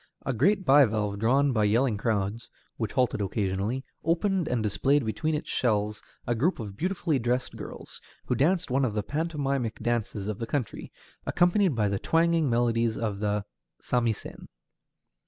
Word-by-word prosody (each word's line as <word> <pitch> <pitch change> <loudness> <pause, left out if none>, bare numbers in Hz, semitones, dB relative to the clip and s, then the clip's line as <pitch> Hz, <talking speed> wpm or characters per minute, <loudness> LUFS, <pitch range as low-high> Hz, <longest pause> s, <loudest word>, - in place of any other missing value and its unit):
A 130 - 0
great 190 - +2
bivalve 110 -7 +4
drawn 135 +5 +3
by 110 -3 +2
yelling 115 +3 +2
crowds 105 +1 -2 0.3
which 110 -3 -3
halted 125 -5 +1
occasionally 100 +5 -1 0.2
opened 175 +2 +1
and 120 -3 0
displayed 130 +7 +2
between 155 +8 -1
its 150 - -4
shells 105 -3 0 0.2
a 120 - +1
group 145 +11 +1
of 105 -4 -6
beautifully 170 - 0
dressed 120 +2 -1
girls, - - -9 0.2
who - - 0
danced 165 +5 +1
one 135 +2 +2
of 115 -5 0
the 105 - 0
pantomimic 140 - -2
dances 110 -4 -2
of 105 -2 -3
the 115 - -3
country, 135 -7 -3 0.4
accompanied 175 - +3
by 105 -2 +2
the 100 -1 -1
twanging 165 -2 +2
melodies 115 -1 +1
of 105 -3 -2
the 105 -1 -1 0.3
samisen. 120 -3 -2
120 Hz, 155 wpm, -27 LUFS, 105-145 Hz, 0.4 s, bivalve